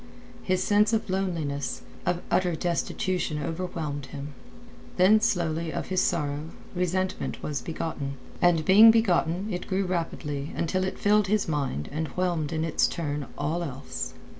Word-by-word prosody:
His 185 Hz, 0 st, +1 dB
sense 210 Hz, +2 st, +3 dB
of 220 Hz, -3 st, 0 dB
loneliness, 160 Hz, -8 st, -2 dB, 0.2 s
of 175 Hz, 0 st, 0 dB
utter 180 Hz, -2 st, +2 dB
destitution 175 Hz, 0 st, -1 dB
overwhelmed 155 Hz, -3 st, -4 dB
him. 145 Hz, +1 st, -7 dB, 0.6 s
Then 200 Hz, +4 st, +6 dB
slowly 170 Hz, -6 st, 0 dB
of -, -, -4 dB
his 185 Hz, -1 st, +2 dB
sorrow 150 Hz, -3 st, 0 dB, 0.3 s
resentment 185 Hz, +1 st, -1 dB
was 145 Hz, -4 st, -2 dB
begotten, 145 Hz, -1 st, -4 dB, 0.3 s
and 170 Hz, -3 st, +4 dB
being 210 Hz, +4 st, +9 dB
begotten 190 Hz, -4 st, +3 dB
it 180 Hz, -, -4 dB
grew 195 Hz, 0 st, 0 dB
rapidly 155 Hz, -5 st, -3 dB
until 185 Hz, +3 st, 0 dB
it 190 Hz, -, -3 dB
filled 210 Hz, 0 st, +3 dB
his 210 Hz, +1 st, +1 dB
mind 140 Hz, -, -1 dB
and 155 Hz, +2 st, -2 dB
whelmed 175 Hz, -5 st, 0 dB
in 160 Hz, 0 st, -1 dB
its 165 Hz, -, +2 dB
turn 145 Hz, -4 st, -3 dB
all 155 Hz, +4 st, -1 dB
else. 80 Hz, -, -5 dB
170 Hz, 145 wpm, -27 LUFS, 150-185 Hz, 0.6 s, being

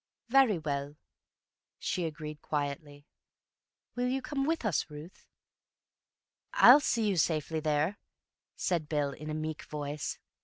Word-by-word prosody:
"Very 260 Hz, -6 st, +5 dB
well," 145 Hz, -2 st, -3 dB, 0.8 s
she 180 Hz, -, -2 dB
agreed 150 Hz, -1 st, -6 dB
quietly. 145 Hz, 0 st, -4 dB, 0.9 s
"You 245 Hz, 0 st, 0 dB
will 260 Hz, +2 st, 0 dB
come 275 Hz, +1 st, -2 dB
with 325 Hz, -6 st, 0 dB
us, 185 Hz, -6 st, 0 dB
Ruth?" 150 Hz, +4 st, -11 dB, 1.3 s
"I'll 260 Hz, +4 st, +9 dB
see 230 Hz, -6 st, +1 dB
you 195 Hz, -3 st, +1 dB
safely 160 Hz, -1 st, +1 dB
there," 155 Hz, +5 st, 0 dB, 0.6 s
said 170 Hz, -4 st, -1 dB
Bill 145 Hz, -2 st, 0 dB
in 155 Hz, +3 st, -8 dB
a 155 Hz, -, -2 dB
meek 155 Hz, 0 st, -4 dB
voice. 150 Hz, 0 st, -4 dB
155 Hz, 125 wpm, -31 LUFS, 150-205 Hz, 1.3 s, I'll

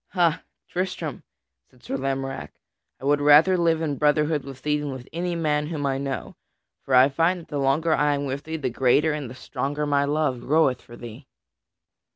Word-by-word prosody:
"Ha, 170 Hz, -4 st, +2 dB, 0.3 s
Tristram," 175 Hz, -6 st, -4 dB, 0.5 s
said 125 Hz, -1 st, -25 dB
Sir -, -, -4 dB
Lamorack, 135 Hz, 0 st, -4 dB, 0.4 s
"I -, -, -8 dB
would 145 Hz, +1 st, +2 dB
rather 150 Hz, +6 st, +6 dB
live 165 Hz, -2 st, +1 dB
in 145 Hz, -3 st, -2 dB
brotherhood 150 Hz, 0 st, +2 dB
with 135 Hz, -1 st, -10 dB
thee 150 Hz, 0 st, +1 dB
than 145 Hz, -1 st, -4 dB
with 130 Hz, -1 st, -8 dB
any 175 Hz, +1 st, -2 dB
man 150 Hz, -2 st, 0 dB
whom 150 Hz, -3 st, -3 dB
I 135 Hz, -1 st, 0 dB
know, 140 Hz, -1 st, -4 dB, 0.5 s
for 130 Hz, -, 0 dB
I 130 Hz, +1 st, +7 dB
find 165 Hz, +6 st, +1 dB
that -, -, -17 dB
the 145 Hz, -, -3 dB
longer 145 Hz, +4 st, +2 dB
I 150 Hz, -1 st, +2 dB
am 140 Hz, 0 st, -3 dB
with 135 Hz, +1 st, -4 dB
thee, 160 Hz, +1 st, -4 dB
the 135 Hz, -5 st, -2 dB
greater 135 Hz, +5 st, +3 dB
and 145 Hz, -5 st, -4 dB
the 125 Hz, -, -10 dB
stronger 145 Hz, +3 st, -3 dB
my 140 Hz, -1 st, +2 dB
love 145 Hz, -3 st, 0 dB
groweth 135 Hz, -2 st, +2 dB
for 120 Hz, -, -13 dB
thee." 120 Hz, +3 st, -10 dB
145 Hz, 195 wpm, -24 LUFS, 135-160 Hz, 0.5 s, I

